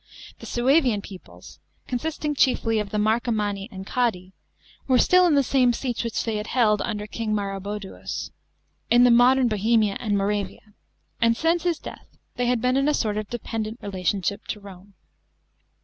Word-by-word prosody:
The -, -, -10 dB
Suevian 245 Hz, -4 st, +2 dB
peoples, 190 Hz, -3 st, -13 dB, 0.3 s
consisting 300 Hz, +4 st, -3 dB
chiefly 235 Hz, -5 st, +2 dB
of 210 Hz, -1 st, -3 dB
the 210 Hz, -, -3 dB
Marcomanni 210 Hz, -2 st, 0 dB
and 190 Hz, -3 st, -9 dB
Quadi, 190 Hz, -6 st, -1 dB, 0.5 s
were 260 Hz, -2 st, +4 dB
still 365 Hz, +6 st, +5 dB
in 315 Hz, -, +3 dB
the 280 Hz, -, +4 dB
same 255 Hz, -2 st, +3 dB
seats 245 Hz, -1 st, -3 dB
which 230 Hz, -1 st, -2 dB
they 215 Hz, -2 st, -2 dB
held 215 Hz, -3 st, +2 dB
under 210 Hz, -3 st, -3 dB
King 215 Hz, 0 st, -3 dB
Maroboduus, 200 Hz, 0 st, -5 dB, 0.6 s
in 240 Hz, +1 st, +6 dB
the 245 Hz, -, +6 dB
modern 250 Hz, +2 st, +5 dB
Bohemia 215 Hz, -1 st, +1 dB
and 210 Hz, -3 st, 0 dB
Moravia; 205 Hz, +1 st, -3 dB, 0.5 s
and 230 Hz, 0 st, +3 dB
since 330 Hz, +1 st, +1 dB
his 345 Hz, -3 st, +1 dB
death -, -, -12 dB, 0.2 s
they 245 Hz, -1 st, -1 dB
had 245 Hz, -2 st, +1 dB
been 250 Hz, +1 st, +2 dB
in 275 Hz, +1 st, +2 dB
a 300 Hz, -, +3 dB
sort 215 Hz, -3 st, -1 dB
of 215 Hz, -1 st, -4 dB
dependent 225 Hz, -1 st, -4 dB
relation 190 Hz, -1 st, -2 dB
to 200 Hz, +3 st, -1 dB, 0.2 s
Rome. 200 Hz, 0 st, -14 dB
225 Hz, 165 wpm, -24 LUFS, 205-250 Hz, 0.6 s, in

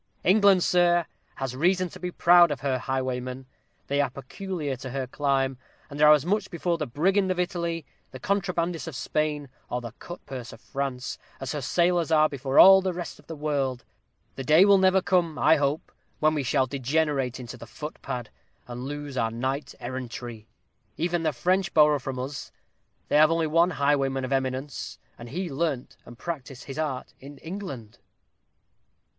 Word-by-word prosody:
England, 195 Hz, -1 st, +5 dB
sir, 175 Hz, -1 st, +3 dB, 0.3 s
has 135 Hz, -2 st, -4 dB
reason 180 Hz, +6 st, +2 dB
to -, -, -12 dB
be 180 Hz, -, -3 dB
proud 175 Hz, 0 st, +6 dB
of 145 Hz, -, -4 dB
her 130 Hz, -2 st, 0 dB
highwaymen. 130 Hz, 0 st, -3 dB, 0.4 s
They 140 Hz, +1 st, +1 dB
are 140 Hz, -, 0 dB
peculiar 145 Hz, +3 st, -5 dB
to 130 Hz, +1 st, -7 dB
her 135 Hz, +1 st, -3 dB
clime, 135 Hz, -1 st, 0 dB, 0.3 s
and 145 Hz, +1 st, -5 dB
are 150 Hz, 0 st, +8 dB
as 150 Hz, -1 st, +2 dB
much 205 Hz, +2 st, 0 dB
before 170 Hz, 0 st, -1 dB
the -, -, -2 dB
brigand 190 Hz, -, +1 dB
of 185 Hz, -1 st, -1 dB
Italy, 170 Hz, -3 st, -2 dB, 0.2 s
the 130 Hz, -, -10 dB
contrabandist 180 Hz, -1 st, -1 dB
of 160 Hz, -, -6 dB
Spain, 150 Hz, +2 st, -1 dB, 0.2 s
or 125 Hz, -, -1 dB
the 120 Hz, -2 st, -7 dB
cut 175 Hz, -, -9 dB
purse 125 Hz, -3 st, -7 dB
of -, -, -13 dB
France 135 Hz, -2 st, -4 dB, 0.2 s
as 135 Hz, -, -4 dB
her 150 Hz, -, -3 dB
sailors 170 Hz, +3 st, +1 dB
are 155 Hz, -1 st, +5 dB
before 135 Hz, -2 st, -3 dB
all 190 Hz, 0 st, +10 dB
the 185 Hz, -1 st, -1 dB
rest 175 Hz, -1 st, -6 dB
of -, -, -20 dB
the 165 Hz, -, -6 dB
world. 140 Hz, -4 st, -2 dB, 0.5 s
The 135 Hz, -, -4 dB
day 155 Hz, +8 st, +6 dB
will 200 Hz, -1 st, +6 dB
never 190 Hz, 0 st, +4 dB
come, 175 Hz, -3 st, +1 dB
I 160 Hz, -, +5 dB
hope, 145 Hz, +1 st, -1 dB, 0.3 s
when 155 Hz, 0 st, +3 dB
we 150 Hz, -, 0 dB
shall 130 Hz, 0 st, +1 dB
degenerate 135 Hz, -1 st, -1 dB
into 125 Hz, -1 st, -8 dB
the 115 Hz, -1 st, -11 dB
footpad, 125 Hz, -2 st, -6 dB, 0.4 s
and 125 Hz, +1 st, -6 dB
lose 145 Hz, -1 st, -6 dB
our 115 Hz, -2 st, +1 dB
Night 130 Hz, +5 st, -3 dB
Errantry. 120 Hz, -3 st, -6 dB, 0.5 s
Even 175 Hz, +1 st, 0 dB
the 160 Hz, -1 st, +1 dB
French 185 Hz, +7 st, 0 dB
borrow 150 Hz, -2 st, +5 dB
from 130 Hz, 0 st, -5 dB
us 130 Hz, +2 st, -5 dB, 0.6 s
they -, -, +4 dB
have 155 Hz, 0 st, +7 dB
only 165 Hz, 0 st, +1 dB
one 165 Hz, +3 st, +3 dB
highwayman 135 Hz, -4 st, +1 dB
of 130 Hz, -, -2 dB
eminence, 130 Hz, 0 st, -3 dB, 0.2 s
and 120 Hz, 0 st, -9 dB
he 180 Hz, +7 st, -3 dB
learnt 145 Hz, -3 st, -2 dB
and 120 Hz, -, -12 dB
practised 135 Hz, -5 st, -6 dB
his 135 Hz, +2 st, -7 dB
art 145 Hz, -5 st, -3 dB
in 140 Hz, +1 st, -11 dB
England." 140 Hz, -, -8 dB
145 Hz, 180 wpm, -26 LUFS, 130-170 Hz, 0.6 s, all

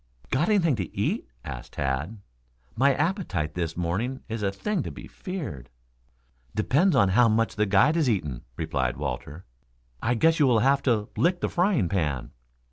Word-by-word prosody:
"Got 150 Hz, +9 st, +2 dB
anything 175 Hz, -9 st, +3 dB
to 95 Hz, -4 st, -5 dB
eat?" -, -, -1 dB, 0.2 s
asked 65 Hz, -4 st, -7 dB
Tad. 70 Hz, +9 st, -2 dB, 0.6 s
"My 135 Hz, +2 st, +4 dB
appetite 160 Hz, -, -1 dB
this 85 Hz, -2 st, -3 dB
morning 100 Hz, +10 st, -2 dB
is 115 Hz, -1 st, -4 dB
a 100 Hz, -1 st, +1 dB
thing 200 Hz, -, -2 dB
to -, -, -5 dB
be -, -, -9 dB
feared." 105 Hz, -, -6 dB, 0.9 s
"Depends 145 Hz, -, +3 dB
upon 100 Hz, -7 st, +4 dB
how 115 Hz, +5 st, +5 dB
much 115 Hz, +1 st, +1 dB
the 105 Hz, -1 st, +1 dB
guide 105 Hz, +11 st, +4 dB
has 155 Hz, -6 st, +2 dB
eaten," 75 Hz, -, -1 dB, 0.2 s
replied 70 Hz, -6 st, -1 dB
Walter. 70 Hz, +7 st, -5 dB, 0.6 s
"I 120 Hz, -, +1 dB
guess 165 Hz, +8 st, +3 dB
you 145 Hz, -, +5 dB
will 120 Hz, -3 st, +4 dB
have 135 Hz, +3 st, +3 dB
to 110 Hz, -5 st, +1 dB
lick 175 Hz, +1 st, +1 dB
the -, -, 0 dB
frying 175 Hz, -, +2 dB
pan." 75 Hz, -9 st, -1 dB
110 Hz, 170 wpm, -26 LUFS, -, 0.9 s, how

